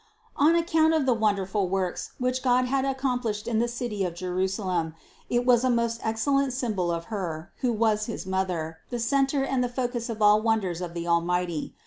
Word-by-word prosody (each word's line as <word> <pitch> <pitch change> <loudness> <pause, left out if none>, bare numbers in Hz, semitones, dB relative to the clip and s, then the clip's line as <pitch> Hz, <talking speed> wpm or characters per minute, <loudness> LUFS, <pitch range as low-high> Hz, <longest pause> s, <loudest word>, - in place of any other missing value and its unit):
250. - - +3
On 330 - +5 0.3
account - - +3
of 305 -4 +1
the 255 - +4
wonderful 200 -3 0
works, 185 -1 -2
which 255 0 -1
God 250 -1 +3
had 265 +1 0
accomplished 250 -6 -1
in 225 -2 +1
the 240 - +2
city 235 -4 -3
of 175 -2 -3
Jerusalem, 185 -2 -2 0.3
it 245 0 +1
was 245 -1 +5
a 255 - +2
most 235 -1 +1
excellent 270 +4 +1
symbol 215 -9 -1
of 170 0 -3
Her, 175 -4 -4
who 250 -3 0
was 215 -1 +1
his 225 - -5
Mother, 180 -4 -2
the 245 - -3
center 270 +3 +1
and 260 -2 0
the 245 - -1
focus 245 -1 -3
of 225 -2 -4
all 210 0 +5
wonders 210 -6 0
of 175 -1 -5
the 170 0 -3
Almighty. 170 -1 0
220 Hz, 195 wpm, -26 LUFS, 185-250 Hz, 0.3 s, On